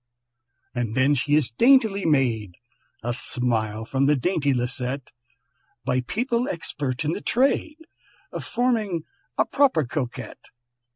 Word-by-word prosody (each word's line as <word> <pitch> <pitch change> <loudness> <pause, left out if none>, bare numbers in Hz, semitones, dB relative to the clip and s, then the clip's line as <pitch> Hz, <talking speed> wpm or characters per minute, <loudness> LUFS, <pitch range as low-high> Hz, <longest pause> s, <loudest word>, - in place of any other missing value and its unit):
"And 120 -2 -2
then 135 +2 +4
she 145 +2 +2
is 150 -5 +2
daintily 220 - +4
made" 115 - +1 0.5
(A 120 +1 -1
smile 110 -3 -1
from 135 +3 +1
the 150 - +5
dainty 145 0 +1
Lisette), 125 +1 -2 0.7
"By 125 0 +1
people 235 - -1
expert 145 -4 -3
in 150 - +1
the 205 - -4
trade 280 +5 +1 0.5
Of - - -5
forming 225 -8 0 0.3
a - - +4
proper 265 - +3
Coquette. 125 -1 -5
140 Hz, 125 wpm, -24 LUFS, 125-200 Hz, 0.7 s, the